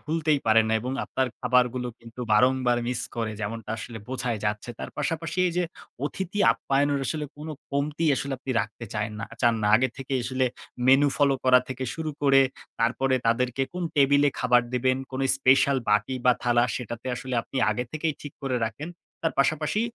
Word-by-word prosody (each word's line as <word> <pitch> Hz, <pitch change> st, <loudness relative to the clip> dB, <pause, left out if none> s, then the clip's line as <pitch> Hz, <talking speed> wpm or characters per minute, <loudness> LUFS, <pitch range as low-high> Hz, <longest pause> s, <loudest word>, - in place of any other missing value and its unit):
ভুলতেই 155 Hz, -1 st, +1 dB
পারে 110 Hz, 0 st, +6 dB
না। -, -, 0 dB
এবং 125 Hz, +3 st, -4 dB
আপনার 130 Hz, -, -1 dB
খাবারগুলো 125 Hz, 0 st, +2 dB
কিন্তু 115 Hz, +1 st, -11 dB
বারংবার 125 Hz, +2 st, +3 dB
মিস 125 Hz, -1 st, -1 dB, 0.2 s
করে 115 Hz, -2 st, -2 dB
যেমনটা 110 Hz, +1 st, -5 dB
আসলে 115 Hz, 0 st, -7 dB
বোঝাই 125 Hz, -3 st, -2 dB
যাচ্ছে। 105 Hz, +3 st, -2 dB
তার -, -, -6 dB
পাশাপাশি 165 Hz, +1 st, -2 dB
এই 175 Hz, -, -1 dB
যে 180 Hz, -, +2 dB, 0.4 s
অতিথি 190 Hz, +6 st, -3 dB
আপ্যায়নের 140 Hz, +1 st, 0 dB
আসলে 150 Hz, +1 st, -2 dB
কোন 155 Hz, +2 st, -8 dB, 0.2 s
কমতি 145 Hz, +3 st, -1 dB
আসলে 135 Hz, +1 st, -3 dB
আপনি 135 Hz, -, -6 dB
রাখতে 110 Hz, +3 st, -6 dB
চায়েননা 105 Hz, +1 st, -3 dB, 0.2 s
চান 120 Hz, -1 st, +5 dB
না। -, -, +2 dB
আগে 130 Hz, +3 st, +1 dB
থেকেই 135 Hz, -1 st, -2 dB
আসলে 130 Hz, +1 st, 0 dB, 0.4 s
মেনু 135 Hz, +2 st, +6 dB
ফলো 140 Hz, -1 st, +3 dB, 0.3 s
থেকে 130 Hz, 0 st, -4 dB
শুরু 160 Hz, -1 st, -3 dB
করে 135 Hz, -1 st, +6 dB, 0.4 s
তারপরে 130 Hz, +3 st, +2 dB
তাদেরকে 125 Hz, +3 st, +1 dB
কোন 180 Hz, 0 st, -4 dB
টেবিলে 145 Hz, +1 st, +5 dB
খাবার 125 Hz, -1 st, +4 dB
দিবেন, 130 Hz, +1 st, +2 dB
কোনো 135 Hz, +1 st, -2 dB
স্পেশাল 135 Hz, +1 st, +4 dB
বাটি 105 Hz, +5 st, +2 dB
বা 125 Hz, -, +6 dB
থালা 120 Hz, -1 st, +3 dB
সেটাতে 120 Hz, 0 st, -6 dB
আসলে 125 Hz, +1 st, -5 dB
আপনি 135 Hz, -, -9 dB
আগে 120 Hz, +3 st, -1 dB
থেকেই 155 Hz, 0 st, -1 dB
ঠিক 145 Hz, -, -8 dB
করে 130 Hz, -2 st, -1 dB
রাখেন। 115 Hz, +8 st, -5 dB, 0.3 s
তার 165 Hz, -, +1 dB
পাশাপাশি 155 Hz, +8 st, +1 dB
130 Hz, 175 wpm, -26 LUFS, 120-145 Hz, 0.4 s, পারে